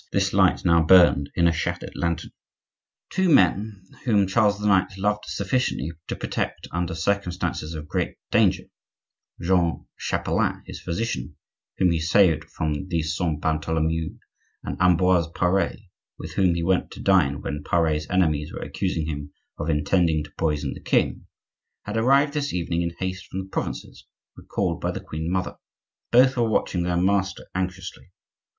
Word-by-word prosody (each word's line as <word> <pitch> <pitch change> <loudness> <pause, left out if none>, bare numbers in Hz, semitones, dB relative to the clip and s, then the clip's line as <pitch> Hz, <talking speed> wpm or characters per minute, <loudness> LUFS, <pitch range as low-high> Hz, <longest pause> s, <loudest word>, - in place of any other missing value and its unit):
this - - +1
light - - +3
now 85 0 +5
burned 80 -5 +6
in 85 -1 +4
a - - +4
shattered 80 - -3
lantern. 85 0 -2 0.8
Two 190 -1 +1
men, 100 - +3 0.2
whom 105 -5 +3
Charles 100 +1 +2
IX. 95 -2 +2
loved 105 +2 0
sufficiently 100 - -1 0.2
to - - -3
protect - - -3
under 85 -1 -2
circumstances 90 -3 -2
of 75 -1 -7
great - - -2 0.2
danger,—Jean 85 -2 -1
Chapelain, - - -1
his - - -9
physician, 85 - -3 0.4
whom 90 - +3
he 85 - +1
saved 85 0 +3
from 80 +3 -3
the 85 -3 -1
Saint 80 -2 -2
Bartholomew, 80 +1 -1 0.5
and - - -4
Ambroise 90 -1 +4
Pare, 90 +2 +1 0.4
with - - -8
whom 90 -3 +2
he 85 - -1
went 90 +1 +1
to - - -11
dine 75 -9 +3
when 75 +1 -4
Pare's 80 -3 0
enemies 80 -5 +1
were - - -6
accusing 90 -5 -2
him 75 -2 -5 0.3
of 75 - -2
intending 80 +1 +2
to 75 - -12
poison 75 -3 -1
the - - -11
king,—had 105 - -3
arrived 135 +5 +3
this 145 -2 -1
evening 85 -1 -1
in 85 - 0
haste 95 0 -4
from 95 - -4
the 95 - -14
provinces, - - -5 0.3
recalled - - -3
by - - -1
the - - -3
queen 80 +2 -5
mother. 90 0 -2 0.5
Both 130 +2 +5
were 115 -2 +2
watching 90 -4 0
their 90 0 0
master 95 +1 0
anxiously. 95 0 -5
90 Hz, 150 wpm, -24 LUFS, 80-95 Hz, 0.8 s, burned